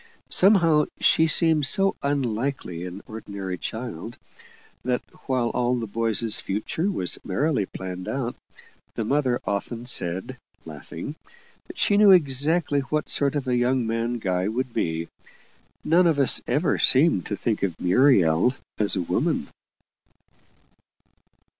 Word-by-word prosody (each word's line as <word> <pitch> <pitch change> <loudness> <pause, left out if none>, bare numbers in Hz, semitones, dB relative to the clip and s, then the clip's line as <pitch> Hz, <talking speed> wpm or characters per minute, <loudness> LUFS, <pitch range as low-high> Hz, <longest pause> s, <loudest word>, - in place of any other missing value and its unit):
Somehow, 170 -6 +4
she 160 - +4
seemed 160 -3 +3
so 195 +7 +2
unlike 135 -1 -2
an 90 +2 -7
ordinary 100 -4 -6
child, 115 -2 -6 0.7
that 125 0 -1 0.2
while 125 -3 0
all 125 +1 0
the 120 -2 -3
boys' 115 0 +2
future 110 - -2
was 125 - -3
merrily 125 +1 0
planned 90 -1 -7
out 130 -3 -3 0.6
the 115 - -2
mother 130 -1 +1
often 115 +4 -3
said, 90 -6 0 0.3
laughing, - - -8 0.6
she 205 - +2
knew 210 -1 +6
exactly 150 -2 +3
what 150 +2 -3
sort 140 0 +1
of 140 -2 -3
a 125 - +1
young 125 0 +1
man 115 +2 -2
Guy 95 -3 -1
would 120 +2 -3
be 80 -3 -2 0.8
none 175 +3 +4
of 160 -3 +2
us 140 -2 +3
ever 155 +2 +1
seemed 135 - +4
to 100 - -2
think 110 +1 -2
of 90 -4 -2
Muriel 95 - +3 0.2
as 105 -1 0
a 95 - 0
woman. 85 - -1
125 Hz, 130 wpm, -24 LUFS, 100-145 Hz, 0.8 s, knew